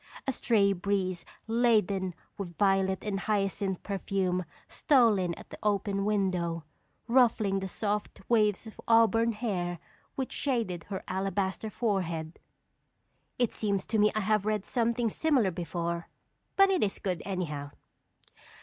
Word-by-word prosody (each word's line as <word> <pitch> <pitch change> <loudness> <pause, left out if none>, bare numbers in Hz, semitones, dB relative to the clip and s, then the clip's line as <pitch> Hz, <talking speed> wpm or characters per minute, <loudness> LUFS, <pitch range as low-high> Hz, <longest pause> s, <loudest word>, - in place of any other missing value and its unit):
A 270 - +1
stray 210 -5 +2
breeze 185 -1 -1 0.2
laden 210 -6 +2 0.2
with 175 -4 -7
violet 195 -1 +2
and 200 -2 -2
hyacinth 195 -2 -1
perfume 190 -2 -1 0.2
stole 240 - +4
in 175 -2 -1
at - - -14
the - - -9
open 200 -1 0
window, 180 -5 0 0.4
ruffling 230 -5 +3
the 190 - -4
soft 210 +2 -3
waves 215 -3 +2
of 220 - -11
auburn 230 0 +4
hair 185 -6 -2 0.4
which 265 -1 -3
shaded 225 - -1
her 195 -2 -5
alabaster 190 +2 -2
forehead." 175 -8 -2 1.0
It 245 -2 +1
seems 200 -3 -1
to 220 - 0
me 210 0 +5
I 215 - +1
have 210 0 +2
read 210 -2 0
something 235 -1 0
similar 265 -11 +2
before, 170 0 -3 0.5
but 390 0 +6
it 370 - +2
is 200 - -1
good, 180 -4 -2
anyhow. 150 -7 -3
200 Hz, 135 wpm, -29 LUFS, 185-225 Hz, 1.0 s, but